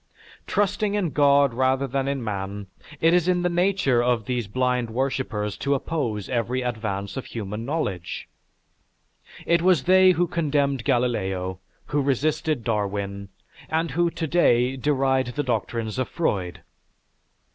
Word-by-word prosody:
Trusting 205 Hz, +1 st, 0 dB
in 185 Hz, -6 st, 0 dB
God 140 Hz, -2 st, +4 dB
rather 130 Hz, +2 st, +1 dB
than 135 Hz, +1 st, -2 dB
in 140 Hz, -2 st, -2 dB
man 100 Hz, -1 st, -4 dB, 0.3 s
it 165 Hz, +1 st, +4 dB
is 175 Hz, -1 st, +3 dB
in 180 Hz, -1 st, +2 dB
the 180 Hz, -, +2 dB
nature 175 Hz, -8 st, +2 dB
of 120 Hz, -3 st, +1 dB
these 125 Hz, -4 st, -2 dB
blind 125 Hz, +1 st, 0 dB
worshippers 115 Hz, -4 st, -2 dB
to 140 Hz, 0 st, 0 dB
oppose 120 Hz, -, -2 dB
every 125 Hz, +1 st, -1 dB
advance 105 Hz, -3 st, -3 dB
of 135 Hz, -, -4 dB
human 110 Hz, 0 st, -5 dB
knowledge. 105 Hz, -, -3 dB, 1.2 s
It 170 Hz, -1 st, +3 dB
was 175 Hz, -6 st, +3 dB
they 185 Hz, 0 st, +6 dB
who 175 Hz, +1 st, +2 dB
condemned 145 Hz, -7 st, 0 dB
Galileo, 95 Hz, -8 st, 0 dB, 0.3 s
who 145 Hz, -1 st, 0 dB
resisted 145 Hz, 0 st, 0 dB
Darwin 100 Hz, -2 st, -2 dB, 0.4 s
and 160 Hz, 0 st, 0 dB
who 170 Hz, +4 st, +2 dB
to 165 Hz, 0 st, -4 dB
day 130 Hz, -6 st, +3 dB
deride 135 Hz, -1 st, +1 dB
the 145 Hz, -, 0 dB
doctrines 115 Hz, -1 st, -2 dB
of 130 Hz, -, -1 dB
Freud." 95 Hz, -, -2 dB
130 Hz, 140 wpm, -24 LUFS, 110-155 Hz, 1.2 s, they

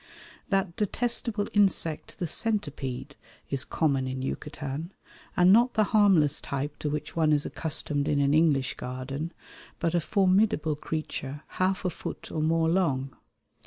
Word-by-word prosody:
That 195 Hz, -4 st, 0 dB
detestable 225 Hz, 0 st, +1 dB
insect 190 Hz, -6 st, +1 dB
the 180 Hz, -, -2 dB
centipede 155 Hz, -, -2 dB, 0.4 s
is 135 Hz, -2 st, +1 dB
common 140 Hz, -5 st, 0 dB
in 130 Hz, 0 st, -4 dB
Yucatan, 150 Hz, +3 st, -5 dB, 0.5 s
and 180 Hz, +2 st, +7 dB
not 240 Hz, +3 st, +4 dB
the 215 Hz, -, +4 dB
harmless 185 Hz, -9 st, +4 dB
type 140 Hz, +2 st, -4 dB
to 150 Hz, -, -2 dB
which 150 Hz, +1 st, -4 dB
one 160 Hz, -2 st, +3 dB
is 145 Hz, -1 st, +3 dB
accustomed 145 Hz, -2 st, -1 dB
in 145 Hz, -, +2 dB
an 140 Hz, 0 st, +3 dB
English 150 Hz, -4 st, +3 dB
garden, 130 Hz, +5 st, -5 dB, 0.5 s
but 165 Hz, -1 st, 0 dB
a 175 Hz, -, +2 dB
formidable 190 Hz, -4 st, +2 dB
creature 150 Hz, -2 st, -5 dB
half 185 Hz, +1 st, 0 dB
a 180 Hz, -, +1 dB
foot -, -, -7 dB
or 155 Hz, -, -2 dB
more 160 Hz, +1 st, +2 dB
long. 140 Hz, -7 st, 0 dB
155 Hz, 145 wpm, -27 LUFS, 140-190 Hz, 0.5 s, and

